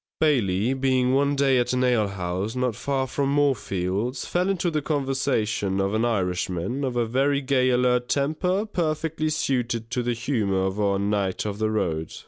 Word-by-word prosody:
Bailey 120 -7 +2
being 130 -1 +1
one 140 +1 +2
day 135 -2 +3
at 120 - 0
an 125 0 +1
alehouse, 100 -4 -1
not 125 -3 0
far 135 +2 -1
from 135 +1 -1
Moorfields, 120 -4 0
fell 180 +2 0
into 180 -3 0
the 155 -1 0
conversation 135 -9 -1
of 95 +1 0
an 110 +2 +1
Irishman, 95 +2 -1
of 130 -2 -2
a 120 -1 +1
very 135 +5 +1
gay 130 -2 +2
alert 125 0 +2
temper 180 +8 0
perfectly 160 -4 -1
suited 120 -6 -1
to 125 - 0
the 120 0 -1
humour 110 -6 0
of 95 +2 -2
our 100 -1 +2
knight 100 -1 -1
of 105 -1 -4
the 110 0 +1
road. 80 -7 -1
125 Hz, 170 wpm, -24 LUFS, 105-140 Hz, -, day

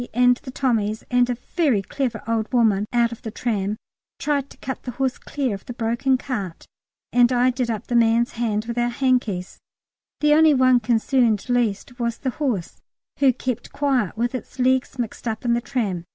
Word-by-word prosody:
and 245 0 +5
the 270 - -11
Tommies 220 -5 0
and 245 0 +3
a 245 - -1 0.2
very 275 - +2
clever 260 +4 -3
old 225 -1 -1
woman 215 -5 +3
out 235 -1 +2
of 235 - -9
the 220 - -5
tram 210 -2 -2 0.4
tried 285 -2 -1
to - - -15
cut 265 0 -5
the - - -7
horse 265 -1 -1
clear 270 -6 -2
of 195 - -7
the 245 - -5
broken 235 +3 +1
cart, 205 -10 -5 0.5
and 245 0 +5
I 250 +1 +3
did 250 -1 -2
up 220 -1 -3
the 240 - -2
man's 235 +1 +3
hand 220 -2 -1
with 235 +1 -3
our 240 0 +1
hankies; 240 -8 -1 0.6
the 300 0 +4
only 310 -1 +6
one 255 -1 +5
concerned 235 -1 +1
least 245 0 -1
was 235 -1 -1
the 260 - -2
horse, 240 - -2 0.4
who 275 -2 +5
kept 250 -1 -4
quiet 260 -9 0
with 240 +2 0
its 255 0 -7
legs 260 +1 +1
mixed 240 0 -4
up 220 +2 -3
in 235 - +3
the 235 - +1
tram. 210 -10 -2
240 Hz, 195 wpm, -23 LUFS, 225-255 Hz, 0.6 s, only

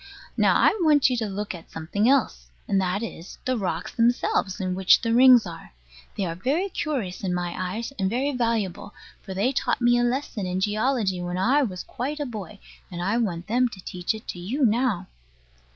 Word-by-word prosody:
Now - - +3
I - - +4
want 295 -5 +4
you 250 - 0
to 225 -2 -1
look 200 +1 -4
at 170 -2 -11
something 200 +8 0
else: 220 - +1 0.2
and 195 -1 +2
that 190 +4 -1
is, 180 -5 -8
the 255 - +1
rocks 180 -6 -3
themselves, 230 -5 +1
in 185 -1 -1
which 185 0 +5
the 230 -1 -1
rings 250 -2 +7
are. 165 - -9 0.4
They 195 - 0
are 165 - -3
very 285 - -1
curious 250 - -3
in 180 -2 -1
my 175 -1 -2
eyes, 205 +8 -4
and 190 -1 +1
very 260 +6 0
valuable; 230 -7 -2 0.3
for 190 -2 -8
they 210 +7 +1
taught 275 - 0
me 240 0 +4
a - - +2
lesson 240 -5 -2
in 180 +1 -2
geology 210 -2 0
when 175 0 -3
I 255 +10 +3
was 185 -9 -3
quite 285 +5 -4
a 290 - -2
boy: 215 -4 -7 0.3
and 175 -3 -7
I 195 +6 0
want 180 -7 -2
them 245 +5 +2
to 205 - -11
teach 180 +3 -3
it 215 - -11
to 175 - -5
you 250 +11 0
now. 225 -4 +1
210 Hz, 205 wpm, -25 LUFS, 185-250 Hz, 0.4 s, rings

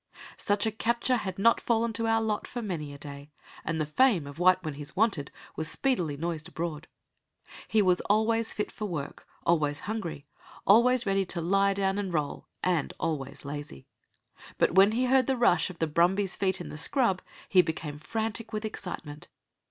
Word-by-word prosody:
Such 205 +1 0
a 220 - +1
capture 235 +3 0
had 190 -5 -4
not 230 +4 +4
fallen 230 -1 +1
to 225 +1 -1
our 225 0 +2
lot 215 -1 -1
for 240 -1 -5
many 160 -8 -4
a 140 - -9
day, 140 0 -9 0.3
and 165 -1 -2
the 155 - +1
fame 180 - +3
of 140 +3 -10
White 185 +1 +4
when 155 -3 -3
he's 145 +3 -9
wanted 195 -9 +1 0.3
was 155 -1 +1
speedily 175 - 0
noised 165 0 -3
abroad. 165 -3 -5 0.8
He 215 -1 +3
was 180 -1 +3
always 225 +2 +2
fit 210 - -3
for 215 - -5
work, 155 -7 -5 0.2
always 150 -4 +2
hungry, 185 -9 -4 0.4
always 235 +4 +5
ready 195 -1 +2
to 175 - -2
lie 195 +3 +2
down 195 0 0
and 195 -3 -3
roll, 150 -4 -2 0.2
and 175 -5 0
always 150 -4 -3
lazy. 145 - -7 0.7
But - - +2
when 195 +3 +6
he 250 +3 +1
heard 260 0 +3
the 265 -1 +1
rush 180 -9 +3
of 180 - -10
the 165 - +1
brumbies' 180 +5 +2
feet 190 -1 0
in 175 - -7
the 150 - -7
scrub 230 - +2 0.3
he 185 - +6
became 155 -3 -5
frantic 220 +6 -3
with 215 0 -3
excitement. 155 -8 -6
185 Hz, 185 wpm, -28 LUFS, 155-220 Hz, 0.8 s, when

